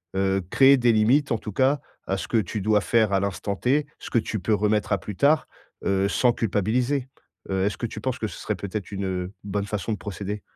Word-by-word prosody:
heu, 95 Hz, 0 st, +1 dB
créer 135 Hz, +1 st, +6 dB
des 120 Hz, -1 st, +4 dB
limites 125 Hz, +7 st, +3 dB
en -, -, +1 dB
tout 105 Hz, -, -7 dB
cas, 135 Hz, +5 st, +2 dB, 0.3 s
à 95 Hz, -, 0 dB
ce -, -, -5 dB
que 115 Hz, -, +1 dB
tu 105 Hz, +1 st, -3 dB
dois 105 Hz, +1 st, +3 dB
faire 110 Hz, -4 st, +2 dB
à 95 Hz, -, +4 dB
l'instant 100 Hz, 0 st, -2 dB
T. 140 Hz, +8 st, +1 dB
Ce -, -, -8 dB
que -, -, +1 dB
tu 110 Hz, -1 st, -3 dB
peux 110 Hz, -, 0 dB
remettre 105 Hz, +1 st, 0 dB
à 100 Hz, -, +3 dB
plus 105 Hz, -, -7 dB
tard, 150 Hz, +7 st, +3 dB, 0.4 s
heu, 95 Hz, 0 st, +2 dB
sans 120 Hz, +1 st, +3 dB
culpabiliser. 120 Hz, +6 st, 0 dB, 0.4 s
Heu, 95 Hz, 0 st, 0 dB
est-ce 100 Hz, -, -1 dB
que 120 Hz, -, -3 dB
tu 110 Hz, -, -8 dB
penses 130 Hz, +1 st, -2 dB
que 110 Hz, -, -1 dB
ce -, -, -9 dB
serait 105 Hz, -, -2 dB
peut-être 100 Hz, +2 st, -5 dB
une, 100 Hz, -1 st, -3 dB
heu, 90 Hz, 0 st, -3 dB
bonne 100 Hz, 0 st, -2 dB
façon 105 Hz, +2 st, -3 dB
de 105 Hz, -, -3 dB
procéder? 100 Hz, +2 st, -5 dB
105 Hz, 240 wpm, -25 LUFS, 100-120 Hz, 0.4 s, créer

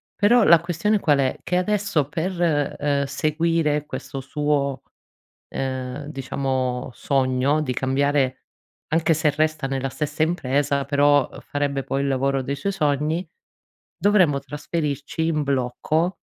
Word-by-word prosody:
Però 225 Hz, +3 st, +4 dB
la 170 Hz, -4 st, +7 dB
questione 180 Hz, +5 st, 0 dB
qual 145 Hz, -5 st, +3 dB
è? 130 Hz, -, 0 dB
Che 180 Hz, -, 0 dB
adesso 195 Hz, -6 st, 0 dB
per, 170 Hz, -3 st, 0 dB
ehm, 140 Hz, -1 st, +1 dB
seguire 155 Hz, +1 st, 0 dB
questo 135 Hz, 0 st, -6 dB
suo, 140 Hz, -1 st, -1 dB, 0.7 s
ehm, 130 Hz, +1 st, -4 dB
diciamo, 130 Hz, -3 st, -2 dB
sogno 135 Hz, +3 st, +1 dB
di 130 Hz, -4 st, -2 dB
cambiare, 135 Hz, 0 st, 0 dB, 0.4 s
anche 165 Hz, 0 st, +2 dB
se 155 Hz, -1 st, +2 dB
resta 155 Hz, -1 st, 0 dB
nella 135 Hz, 0 st, -2 dB
stessa 150 Hz, +2 st, -3 dB
impresa 140 Hz, -3 st, +1 dB
però 145 Hz, 0 st, +3 dB
farebbe 140 Hz, -1 st, -2 dB
poi 135 Hz, +1 st, -1 dB
il 140 Hz, -, 0 dB
lavoro 135 Hz, 0 st, +1 dB
dei 140 Hz, +2 st, -3 dB
suoi 200 Hz, +8 st, -2 dB
sogni, 150 Hz, +2 st, 0 dB, 0.7 s
dovremmo 185 Hz, -9 st, +3 dB
trasferirci 150 Hz, +1 st, -3 dB
in 155 Hz, -2 st, 0 dB
blocco 140 Hz, +6 st, 0 dB
145 Hz, 130 wpm, -23 LUFS, 135-160 Hz, 0.7 s, la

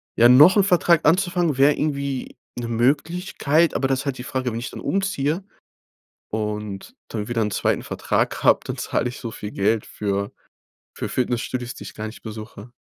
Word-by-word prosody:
ja, 120 Hz, -, +6 dB
noch 150 Hz, -, +8 dB
’n 200 Hz, -, +6 dB
Vertrag 175 Hz, -4 st, +3 dB
anzufangen 175 Hz, -3 st, +2 dB
wär 140 Hz, +2 st, +5 dB
irgendwie 140 Hz, -3 st, -2 dB, 0.2 s
’ne 120 Hz, -, -4 dB
Möglichkeit, 150 Hz, -, +1 dB
aber 135 Hz, -, +1 dB
da 135 Hz, -, +1 dB
ist 135 Hz, +2 st, -2 dB
halt 135 Hz, -2 st, -2 dB
die 125 Hz, -, -7 dB
Frage, 130 Hz, -1 st, -2 dB
wenn 115 Hz, -, -3 dB
ich 120 Hz, -, -6 dB
dann -, -, -8 dB
umziehe 190 Hz, -3 st, -1 dB, 0.9 s
und 105 Hz, -2 st, -4 dB
dann 105 Hz, -2 st, -4 dB
wieder 120 Hz, -1 st, 0 dB
’n 105 Hz, -, 0 dB
2. -, -, 0 dB
Vertrag -, -, -1 dB
hab, -, -, +4 dB
dann -, -, -4 dB
zahle -, -, -1 dB
ich 125 Hz, -, -8 dB
so 115 Hz, -, -5 dB
viel 105 Hz, -, -7 dB
Geld 105 Hz, +2 st, +1 dB
für 100 Hz, -1 st, -3 dB, 0.6 s
für -, -, -3 dB
Fitnessstudios, 125 Hz, 0 st, -2 dB
die -, -, -10 dB
ich -, -, -9 dB
gar 110 Hz, 0 st, -5 dB
nicht 110 Hz, -, -10 dB
besuche. 110 Hz, 0 st, -9 dB
125 Hz, 185 wpm, -23 LUFS, 110-150 Hz, 0.9 s, noch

